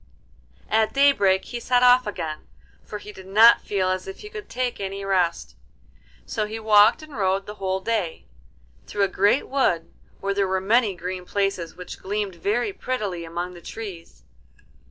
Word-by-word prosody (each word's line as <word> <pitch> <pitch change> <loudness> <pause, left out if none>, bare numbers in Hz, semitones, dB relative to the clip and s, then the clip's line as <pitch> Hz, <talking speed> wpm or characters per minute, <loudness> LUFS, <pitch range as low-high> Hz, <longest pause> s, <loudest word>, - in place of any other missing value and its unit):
At 220 0 +2
daybreak 205 -10 +4
he 240 - -5
set 250 +1 +2
off 250 -1 +6
again, 160 -6 -5 0.4
for 210 - -7
he 210 0 -10
did 190 -2 -13
not 220 +4 +7
feel 190 -2 -1
as 185 0 -2
if 190 - -8
he 420 - -9
could 425 -2 -8
take 250 -1 -2
any 195 0 -4
rest. 180 -3 0 0.7
So 215 -3 -2
he 220 +1 -5
walked 220 +5 +5
and 305 -3 -11
rode 195 -1 0
the 210 - -7
whole 190 0 -1
day, 200 -6 -2 0.6
through 205 - 0
a - - +4
great 200 +7 +2
wood 260 -12 0 0.3
where 200 0 -1
there 200 -1 +1
were 190 0 0
many 210 +1 +2
green 180 +1 -5
places 195 -4 -2
which 180 0 -9
gleamed 205 0 -3
very 215 - -1
prettily 205 - -3
among 175 +2 -5
the 175 - -12
trees. 170 - -9
200 Hz, 175 wpm, -24 LUFS, 185-225 Hz, 0.7 s, not